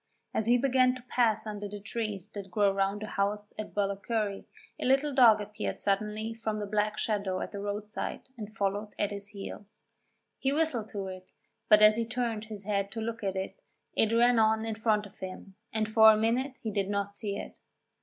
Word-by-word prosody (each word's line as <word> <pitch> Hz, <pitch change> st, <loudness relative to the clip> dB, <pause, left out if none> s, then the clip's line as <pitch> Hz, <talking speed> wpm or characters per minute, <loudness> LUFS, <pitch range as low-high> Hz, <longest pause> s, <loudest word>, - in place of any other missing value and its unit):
As 220 Hz, -, 0 dB
he 240 Hz, +1 st, +6 dB
began 255 Hz, 0 st, +3 dB
to 255 Hz, -, -10 dB
pass 225 Hz, -3 st, +2 dB
under 210 Hz, -1 st, -4 dB
the 205 Hz, 0 st, -7 dB
trees 210 Hz, -1 st, -4 dB
that 200 Hz, -2 st, -8 dB
grow 200 Hz, +1 st, +3 dB
round 195 Hz, +2 st, 0 dB
the -, -, -2 dB
house 205 Hz, 0 st, -2 dB
at 215 Hz, -, -6 dB
Ballacurry, 200 Hz, +1 st, -1 dB, 0.3 s
a -, -, -2 dB
little 275 Hz, +3 st, +3 dB
dog 235 Hz, -5 st, +7 dB
appeared 210 Hz, +1 st, -4 dB
suddenly 210 Hz, +2 st, -1 dB
from 220 Hz, -1 st, -3 dB
the 210 Hz, -, -3 dB
black 210 Hz, +1 st, 0 dB
shadow 200 Hz, -4 st, -1 dB
at -, -, -4 dB
the 200 Hz, -, -6 dB
roadside 205 Hz, +1 st, -4 dB
and 215 Hz, -3 st, -7 dB
followed 205 Hz, 0 st, -2 dB
at 205 Hz, -, 0 dB
his 200 Hz, 0 st, -4 dB
heels. 205 Hz, 0 st, -9 dB, 0.6 s
He 270 Hz, -, +1 dB
whistled 285 Hz, -8 st, 0 dB
to 200 Hz, -2 st, -4 dB
it, 185 Hz, -1 st, -8 dB, 0.4 s
but 210 Hz, 0 st, +7 dB
as 215 Hz, +1 st, +7 dB
he 230 Hz, -1 st, -1 dB
turned 230 Hz, -2 st, -2 dB
his 215 Hz, -2 st, -6 dB
head 200 Hz, -1 st, -1 dB
to 225 Hz, -, -4 dB
look 225 Hz, 0 st, -4 dB
at 195 Hz, -1 st, -1 dB
it, 190 Hz, -, -4 dB, 0.3 s
it 220 Hz, -, +2 dB
ran 235 Hz, +1 st, +5 dB
on 220 Hz, 0 st, +3 dB
in 225 Hz, -, -2 dB
front 215 Hz, -1 st, +1 dB
of 205 Hz, -, -15 dB
him, 190 Hz, +1 st, -8 dB, 0.2 s
and 220 Hz, -1 st, 0 dB
for 220 Hz, 0 st, +8 dB
a 215 Hz, -, +3 dB
minute 250 Hz, +5 st, 0 dB
he 220 Hz, -, -2 dB
did 200 Hz, -1 st, -1 dB
not 200 Hz, 0 st, -2 dB
see 205 Hz, -2 st, -2 dB
it. -, -, -8 dB
215 Hz, 205 wpm, -30 LUFS, 200-225 Hz, 0.6 s, for